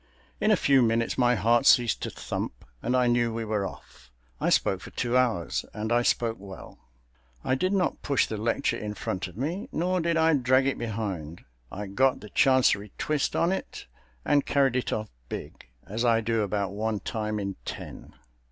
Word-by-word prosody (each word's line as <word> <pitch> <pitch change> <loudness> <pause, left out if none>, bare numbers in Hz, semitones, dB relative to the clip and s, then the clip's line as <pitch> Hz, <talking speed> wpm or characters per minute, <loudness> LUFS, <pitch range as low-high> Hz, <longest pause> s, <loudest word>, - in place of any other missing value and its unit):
In - - +2
a - - +6
few 135 -2 +4
minutes 115 0 +1
my 125 -1 +3
heart 120 +5 +3
ceased 120 -3 +5
to - - -3
thump - - -5 0.2
and 125 +2 +1
I 125 - +3
knew 120 -1 +2
we 115 0 -3
were 105 -2 -1
off. - - -14 0.3
I - - +1
spoke - - +2
for - - -9
two 120 +1 -2
hours, 120 -9 +1
and 110 +2 -3
I 120 0 +4
spoke 115 -1 +1
well. 95 -2 -11 0.6
I 130 - 0
did 185 +8 +1
not 195 -2 0
push 140 -2 +2
the 110 - -5
lecture 115 +6 0
in 105 -1 -5
front 95 0 -3
of 90 +1 -13
me, 160 - -3
nor 180 +2 0
did 165 0 +1
I 160 0 +4
drag 130 -1 +3
it 135 - -1
behind. 100 -8 -4 0.3
I 105 +2 -5
got 130 +7 +2
the 105 - -11
chancery 125 -6 +3
twist 150 -2 -1
on 170 - +2
it 190 - -5 0.4
and 145 -1 +3
carried 135 -3 +2
it 130 - -1
off 110 0 -3 0.2
big, - - -8 0.2
as 110 +4 -3
I 115 -2 +4
do 115 0 0
about 100 -1 -1
one 105 +1 -2
time 110 -1 -3
in 100 -2 -4
ten. - - -8
115 Hz, 195 wpm, -27 LUFS, 105-130 Hz, 0.6 s, a